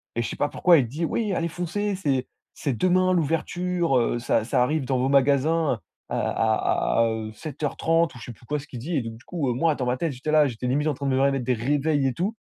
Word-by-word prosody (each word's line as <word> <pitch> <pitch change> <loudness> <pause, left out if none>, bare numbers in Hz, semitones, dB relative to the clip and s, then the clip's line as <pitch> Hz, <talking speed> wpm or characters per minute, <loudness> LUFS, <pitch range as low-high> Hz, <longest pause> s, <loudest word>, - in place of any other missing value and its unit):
et 120 - 0
je 115 - -3
sais - - -6
pas 145 - +1
pourquoi 175 +3 +4
il 130 -5 +1
dit: 155 +8 -5
«Oui, 210 +3 -1
allez 170 -1 -1
foncez! 195 +5 -2
C'est 140 -9 0 0.3
c'est 135 -6 -3
demain 185 +3 +3
l'ouverture, 170 -1 0
heu, 120 0 +1
ça 115 -2 +1
ça 125 - +2
arrive 150 +1 0
dans 130 -1 0
vos 130 +2 +1
magasins 140 +3 +2 0.3
à - - -3
à - - +1
à - - +1
à, 115 - +4
heu, 110 -1 -4
7:30» 155 +5 -1
ou - - -9
je 115 - -10
sais 120 - -7
plus 120 - -16
quoi 150 +5 -2
ce 145 - -11
qu'il 125 - -8
dit 160 +8 -3
et 140 - +1
donc 115 -1 -7
du 120 - -20
coup, 155 -8 -2
heu, - - +1
moi 155 +5 +1
dans 130 - -3
ma 125 +1 0
tête, 165 -1 -2
j'étais 130 +5 -4
là, 150 -2 +5
j'étais 125 0 -4
limite 145 +4 +1
en 150 - +1
train 140 +2 -6
de 135 - +1
me 130 - +2
remettre 135 -2 +2
des 125 +1 +1
réveils 145 +4 +1
et 130 - -1
tout 190 - -2
140 Hz, 275 wpm, -25 LUFS, 125-165 Hz, 0.3 s, là